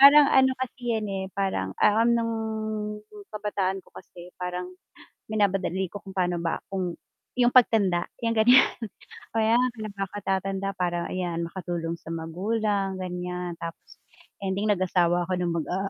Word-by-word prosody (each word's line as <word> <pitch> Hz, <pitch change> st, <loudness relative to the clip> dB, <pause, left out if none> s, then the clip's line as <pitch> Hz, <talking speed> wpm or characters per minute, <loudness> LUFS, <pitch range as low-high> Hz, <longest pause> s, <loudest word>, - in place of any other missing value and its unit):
Parang 285 Hz, +2 st, +10 dB
ano 265 Hz, 0 st, +6 dB
kasi 245 Hz, -2 st, -2 dB
yan 215 Hz, -, -3 dB
eh 195 Hz, -1 st, -2 dB
parang, 140 Hz, -, -1 dB
ah, 210 Hz, +1 st, +5 dB
nung 230 Hz, -1 st, +2 dB, 1.0 s
kabataan 200 Hz, -2 st, -1 dB
'ko -, -, -22 dB
kasi 175 Hz, 0 st, -12 dB
parang 180 Hz, 0 st, -3 dB, 0.6 s
minamadali 195 Hz, -3 st, +1 dB
ko -, -, -5 dB
kung 195 Hz, -, -9 dB
pa'no 180 Hz, -2 st, +1 dB
ba 170 Hz, -1 st, -1 dB
kung 185 Hz, -3 st, -1 dB, 0.4 s
yung 245 Hz, -1 st, +4 dB
pagtanda, 205 Hz, -8 st, +4 dB, 0.2 s
yan 230 Hz, -, +2 dB
ganyan. 245 Hz, +4 st, +7 dB, 0.7 s
Kaya 225 Hz, 0 st, +3 dB, 0.2 s
pinagkatatanda 195 Hz, -1 st, -2 dB
para 175 Hz, -1 st, 0 dB
ayan 175 Hz, -2 st, -2 dB
makatulong 170 Hz, -2 st, -3 dB
sa 165 Hz, -, -11 dB
magulang 195 Hz, +4 st, -1 dB
gan'yan 180 Hz, -1 st, -4 dB
tapos, 165 Hz, 0 st, -8 dB, 0.4 s
ending 195 Hz, +2 st, 0 dB
nag-asawa 175 Hz, -2 st, +2 dB
ako 185 Hz, -, -1 dB
nung 175 Hz, -1 st, 0 dB
mag, -, -, -7 dB
ah, 195 Hz, +2 st, -1 dB
190 Hz, 140 wpm, -26 LUFS, 180-215 Hz, 1.0 s, Parang